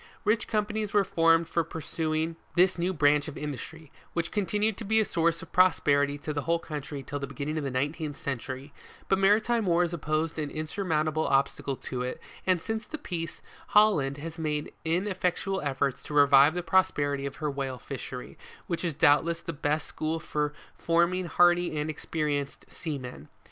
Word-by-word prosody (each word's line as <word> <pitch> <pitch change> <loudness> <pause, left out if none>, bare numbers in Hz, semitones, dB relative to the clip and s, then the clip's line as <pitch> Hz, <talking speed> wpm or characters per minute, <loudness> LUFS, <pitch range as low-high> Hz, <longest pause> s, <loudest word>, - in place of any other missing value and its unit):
Rich 215 +2 +2
companies 210 -1 -1
were 205 - +6
formed 165 -2 +3
for 170 - +1
pursuing 160 0 -2 0.2
this 180 0 +4
new 175 +2 +1
branch 145 -3 +3
of 155 - -7
industry, 150 +2 -6 0.2
which 170 -1 -1
continued 210 +1 0
to - - -6
be 220 +1 +3
a 220 - +3
source 165 -2 +1
of 165 - -13
prosperity 145 -6 +3
to 150 +1 -4
the 145 - -1
whole 165 +4 +1
country 150 -3 -6
till 145 +2 -5
the 140 - -4
beginning 140 +3 -4
of - - -4
the 140 - -1
nineteenth 145 +3 -2
century; 135 +1 -5 0.3
but 195 - +2
maritime 215 +3 +3
wars 175 0 +2
opposed 155 0 -1
an 150 -1 -2
insurmountable 155 -1 -1
obstacle 135 0 +1
to 125 -1 -5
it, 125 0 -3 0.3
and 185 -3 +2
since 220 -1 -3
the 310 - -5
peace, 170 - -5 0.3
Hol 210 -2 +7
land 135 -1 -2
has 160 +2 -7
made 150 -2 -2
ineffectual 185 +2 0
efforts 135 -2 -1
to 150 - -7
revive 145 +2 +6
the 180 - -2
prosperity 150 -6 +2
of 135 - -7
her 150 -2 -2
whale 135 -2 -3
fishery, 125 -1 -7 0.3
which 170 -1 -3
is 165 -5 -1
doubtless 165 +2 +3
the 170 - -5
best 150 +1 -1
school 160 +1 -2
for 150 -2 -1 0.2
forming 170 +2 +1
hardy 175 -1 +3
and 150 +1 -1
experienced 145 -2 -3
seamen. 130 - -6
160 Hz, 175 wpm, -28 LUFS, 145-175 Hz, 0.3 s, Hol